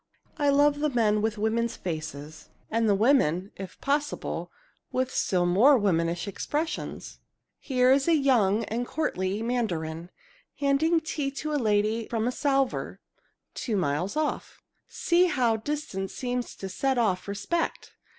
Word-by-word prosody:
I 290 Hz, -1 st, +3 dB
love 290 Hz, +1 st, +4 dB
the 300 Hz, 0 st, +1 dB
men 215 Hz, -5 st, +2 dB
with 220 Hz, 0 st, -1 dB
women's 230 Hz, +2 st, 0 dB
faces 155 Hz, -2 st, -6 dB, 0.2 s
and 225 Hz, -1 st, +2 dB
the 200 Hz, -, +4 dB
women, 200 Hz, -, +2 dB
if 190 Hz, -1 st, -9 dB
possible, 290 Hz, +1 st, -2 dB, 0.4 s
with 255 Hz, 0 st, -1 dB
still 180 Hz, -2 st, +1 dB
more 225 Hz, +11 st, +5 dB
womanish 175 Hz, -3 st, 0 dB
expressions. 300 Hz, -, -4 dB, 0.4 s
"Here 255 Hz, -2 st, +2 dB
is 275 Hz, +2 st, +3 dB
a 335 Hz, -, +5 dB
young 230 Hz, -7 st, +3 dB
and 235 Hz, +3 st, -3 dB
courtly 205 Hz, -9 st, -2 dB
Mandarin, 175 Hz, -9 st, -2 dB, 0.5 s
handing 310 Hz, +4 st, +2 dB
tea 300 Hz, -3 st, -2 dB
to 300 Hz, +2 st, -4 dB
a 290 Hz, -, +1 dB
lady 215 Hz, +1 st, +1 dB
from 225 Hz, 0 st, -1 dB
a -, -, +1 dB
salver 275 Hz, -1 st, 0 dB, 0.5 s
two 220 Hz, -5 st, -2 dB
miles 175 Hz, -, -1 dB
off. 310 Hz, -1 st, -3 dB, 0.2 s
See 345 Hz, +1 st, +2 dB
how 245 Hz, -8 st, +2 dB
distance 220 Hz, -6 st, -4 dB
seems 245 Hz, -1 st, -3 dB
to 195 Hz, -, -6 dB
set 265 Hz, +7 st, -1 dB
off 205 Hz, -6 st, +1 dB
respect! 325 Hz, +12 st, -3 dB
235 Hz, 140 wpm, -27 LUFS, 195-280 Hz, 0.5 s, more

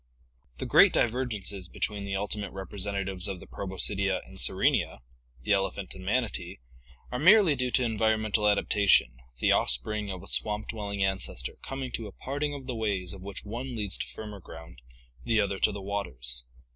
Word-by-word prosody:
The -, -, -4 dB
great -, -, +7 dB
divergences 110 Hz, -6 st, 0 dB
between 100 Hz, +3 st, -3 dB
the 100 Hz, 0 st, -2 dB
ultimate 105 Hz, +1 st, -2 dB
representatives 95 Hz, -1 st, -1 dB
of 95 Hz, -2 st, -4 dB
the -, -, -11 dB
Proboscidea 95 Hz, 0 st, 0 dB
and -, -, -11 dB
Sirenia, -, -, +2 dB, 0.4 s
the -, -, -1 dB
elephant 95 Hz, -1 st, -1 dB
and 95 Hz, -, -10 dB
manatee, 100 Hz, -4 st, -1 dB, 0.5 s
are 125 Hz, -, -2 dB
merely 185 Hz, +1 st, +7 dB
due 125 Hz, -1 st, 0 dB
to 125 Hz, -, +2 dB
environmental 110 Hz, -2 st, +2 dB
adaptation, 100 Hz, -11 st, +4 dB, 0.2 s
the -, -, +3 dB
offspring 105 Hz, -, +1 dB
of 95 Hz, -2 st, -5 dB
a -, -, -11 dB
swamp 105 Hz, -, 0 dB
dwelling 100 Hz, -3 st, -2 dB
ancestor 95 Hz, -10 st, -2 dB
coming 135 Hz, -1 st, -5 dB
to 115 Hz, -2 st, -3 dB
a -, -, -9 dB
parting 145 Hz, +5 st, -3 dB
of 135 Hz, -2 st, -8 dB
the 130 Hz, -, -3 dB
ways 100 Hz, -6 st, -2 dB
of 95 Hz, -, -10 dB
which 100 Hz, +2 st, -6 dB
one 120 Hz, +4 st, -5 dB
leads 105 Hz, -4 st, 0 dB
to -, -, -3 dB
firmer 105 Hz, -2 st, -8 dB
ground, 80 Hz, -8 st, -12 dB, 0.4 s
the 110 Hz, -, +2 dB
other 100 Hz, -2 st, 0 dB
to -, -, +3 dB
the 100 Hz, -1 st, -6 dB
waters. 65 Hz, -12 st, -2 dB
100 Hz, 170 wpm, -29 LUFS, 95-110 Hz, 0.5 s, great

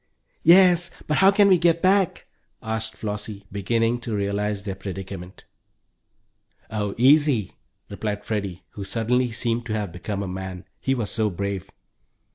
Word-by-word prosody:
"Yes, 175 Hz, 0 st, +6 dB, 0.2 s
but 150 Hz, -, 0 dB
how 195 Hz, -, +7 dB
can 200 Hz, 0 st, +5 dB
we 185 Hz, -3 st, +5 dB
get 170 Hz, -1 st, +2 dB
back?" 190 Hz, -1 st, +2 dB, 0.4 s
asked 110 Hz, 0 st, -3 dB
Flossie, 105 Hz, -1 st, -5 dB
beginning 115 Hz, +4 st, 0 dB
to 115 Hz, -2 st, -4 dB
realize 100 Hz, 0 st, -1 dB
their 100 Hz, -2 st, -3 dB
predicament. 95 Hz, -1 st, -8 dB, 1.3 s
"Oh, 105 Hz, -2 st, -2 dB
easy!" 135 Hz, -, +4 dB, 0.4 s
replied 105 Hz, +1 st, -4 dB
Freddie, 100 Hz, -4 st, -3 dB
who 100 Hz, -, -7 dB
suddenly 120 Hz, +5 st, 0 dB
seemed 120 Hz, +1 st, -1 dB
to 110 Hz, -, -2 dB
have 105 Hz, -4 st, -2 dB
become 100 Hz, +3 st, -4 dB
a -, -, -4 dB
man, 95 Hz, 0 st, -6 dB
he 135 Hz, -, 0 dB
was 115 Hz, -5 st, -2 dB
so 110 Hz, -2 st, +1 dB
brave. 100 Hz, 0 st, -4 dB
110 Hz, 145 wpm, -24 LUFS, 100-125 Hz, 1.3 s, how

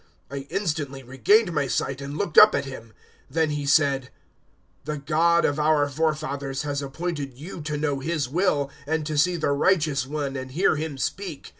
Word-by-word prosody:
"I 140 Hz, 0 st, -6 dB
instantly 145 Hz, -8 st, -2 dB
regained 175 Hz, -, +3 dB
my 145 Hz, -3 st, 0 dB
sight 135 Hz, +1 st, -2 dB
and 140 Hz, +2 st, -6 dB
looked 185 Hz, -5 st, -3 dB
up 215 Hz, 0 st, +9 dB
at -, -, -1 dB
him. 130 Hz, -4 st, -8 dB, 0.5 s
022:014 -, -, -19 dB
Then 160 Hz, -1 st, +2 dB
he 145 Hz, -1 st, -3 dB
said, 140 Hz, -2 st, +3 dB, 0.7 s
`The 150 Hz, -2 st, -5 dB
God 170 Hz, +2 st, +3 dB
of 145 Hz, +1 st, 0 dB
our 150 Hz, -1 st, +3 dB
forefathers 140 Hz, -2 st, -2 dB
has 145 Hz, -1 st, -2 dB
appointed 140 Hz, -2 st, -4 dB
you 165 Hz, +4 st, -8 dB
to 150 Hz, 0 st, -3 dB
know 145 Hz, -2 st, -1 dB
His 155 Hz, -1 st, -1 dB
will, 145 Hz, -2 st, 0 dB, 0.2 s
and 160 Hz, 0 st, -1 dB
to 155 Hz, 0 st, -3 dB
see 175 Hz, +5 st, +3 dB
the 155 Hz, -4 st, 0 dB
righteous 145 Hz, -3 st, +2 dB
One 140 Hz, -1 st, -3 dB
and 130 Hz, -1 st, -6 dB
hear 180 Hz, +3 st, +3 dB
Him 155 Hz, -2 st, -4 dB
speak. 170 Hz, +2 st, -4 dB
150 Hz, 185 wpm, -25 LUFS, 140-160 Hz, 0.7 s, up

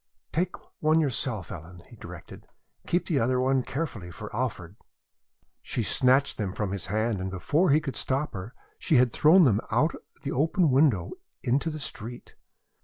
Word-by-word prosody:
"Take 180 Hz, +3 st, -1 dB, 0.2 s
one 155 Hz, +1 st, +3 dB
yourself, 125 Hz, -, -1 dB
Ellen," 85 Hz, +2 st, -10 dB
he -, -, -14 dB
directed. -, -, -11 dB, 0.4 s
"Keep 175 Hz, -, +1 dB
the 150 Hz, -5 st, +1 dB
other 125 Hz, +2 st, +1 dB
one 130 Hz, +1 st, +2 dB
carefully 125 Hz, -, -4 dB
for 105 Hz, +5 st, -8 dB
Alfred." 100 Hz, -7 st, -3 dB, 0.9 s
She 120 Hz, -, -2 dB
snatched 130 Hz, +5 st, +3 dB
them 100 Hz, -3 st, -2 dB
from 105 Hz, -3 st, -2 dB
his 95 Hz, -4 st, -2 dB
hand 110 Hz, +1 st, 0 dB
and 95 Hz, -, -3 dB
before 145 Hz, -, +1 dB
he 150 Hz, -, +5 dB
could 145 Hz, -4 st, -5 dB
stop 135 Hz, +3 st, -1 dB
her 100 Hz, +6 st, -7 dB, 0.2 s
she 165 Hz, -, +1 dB
had 125 Hz, -2 st, +5 dB
thrown 170 Hz, +5 st, +6 dB
them 110 Hz, -8 st, +3 dB
out -, -, +2 dB
of -, -, -16 dB
the -, -, -3 dB
open 160 Hz, +3 st, +2 dB
window 130 Hz, -, +3 dB, 0.3 s
into 140 Hz, +7 st, +1 dB
the 155 Hz, -1 st, -5 dB
street. 120 Hz, -3 st, -7 dB
125 Hz, 175 wpm, -27 LUFS, 105-150 Hz, 0.9 s, thrown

